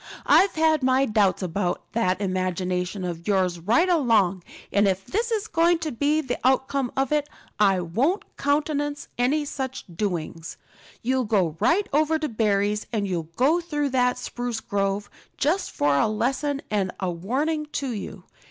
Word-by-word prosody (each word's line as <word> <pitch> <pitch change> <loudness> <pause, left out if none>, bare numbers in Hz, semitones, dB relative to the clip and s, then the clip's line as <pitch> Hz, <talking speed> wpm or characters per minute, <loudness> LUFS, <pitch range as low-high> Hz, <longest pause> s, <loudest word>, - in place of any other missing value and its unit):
I've 390 0 +5
had 315 -1 +3
my 260 +1 +3
doubts 210 -5 +2
about 180 +1 -2
that 190 -5 +1
imagination 185 0 -2
of 170 -1 -5
yours 185 -4 +1
right 230 - +3
along, 225 - +3 0.3
and 200 0 +4
if 190 0 -1
this 460 +4 -1
is 435 -2 0
going 340 -3 +3
to 320 -2 -4
be 290 +6 +1
the 260 -4 -4
outcome 265 0 +1
of 270 0 +1
it, 295 -1 +1 0.3
I 195 -3 +4
won't 250 - -1
countenance 290 0 -1
any 290 +5 +2
such 265 -2 -5
doings. 165 -4 -3 0.5
You'll 255 +1 +1
go 190 -8 +1
right 390 +4 +2
over 310 +2 +3
to 310 -1 -2
Barry's, 210 -2 0
and 210 -4 -1
you'll 170 -4 -3
go 300 - +3
through 295 -4 -2
that 250 -1 +2
spruce 245 -2 -4
grove, 200 -1 -1 0.3
just 345 +7 +1
for 145 -1 +1
a 140 - +3
lesson 270 +6 -1
and 195 -3 0
a 190 -2 -1
warning 285 - -1
to 275 -3 -2
you. 200 -3 -6
240 Hz, 160 wpm, -25 LUFS, 190-295 Hz, 0.5 s, I've